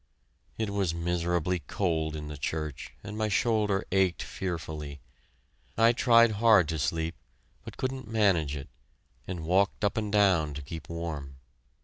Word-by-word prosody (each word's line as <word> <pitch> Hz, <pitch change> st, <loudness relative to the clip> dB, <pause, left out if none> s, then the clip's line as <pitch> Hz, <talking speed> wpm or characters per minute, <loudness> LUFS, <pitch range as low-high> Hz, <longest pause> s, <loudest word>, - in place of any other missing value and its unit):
It 110 Hz, -2 st, -2 dB
was 95 Hz, -5 st, 0 dB
miserably 85 Hz, +1 st, 0 dB
cold 80 Hz, -4 st, -1 dB
in 75 Hz, -1 st, -6 dB
the 75 Hz, -, -6 dB
church, 75 Hz, -1 st, -4 dB
and 105 Hz, -, -7 dB
my 110 Hz, 0 st, 0 dB
shoulder 105 Hz, -2 st, +1 dB
ached 95 Hz, -3 st, +2 dB
fearfully. 80 Hz, -5 st, -5 dB, 0.8 s
I 115 Hz, +1 st, +6 dB
tried 115 Hz, -1 st, +5 dB
hard 110 Hz, -8 st, +6 dB
to 80 Hz, -1 st, -2 dB
sleep, 80 Hz, +3 st, -1 dB, 0.5 s
but -, -, -10 dB
couldn't 130 Hz, -2 st, -3 dB
manage 95 Hz, -10 st, +2 dB
it, 70 Hz, -1 st, -7 dB, 0.6 s
and 90 Hz, -4 st, -5 dB
walked 95 Hz, +4 st, +2 dB
up 100 Hz, -, 0 dB
and 105 Hz, -2 st, -1 dB
down 90 Hz, -8 st, +3 dB
to 75 Hz, -, -6 dB
keep 80 Hz, +4 st, -8 dB
warm. 80 Hz, -5 st, -5 dB
90 Hz, 145 wpm, -29 LUFS, 80-105 Hz, 0.8 s, I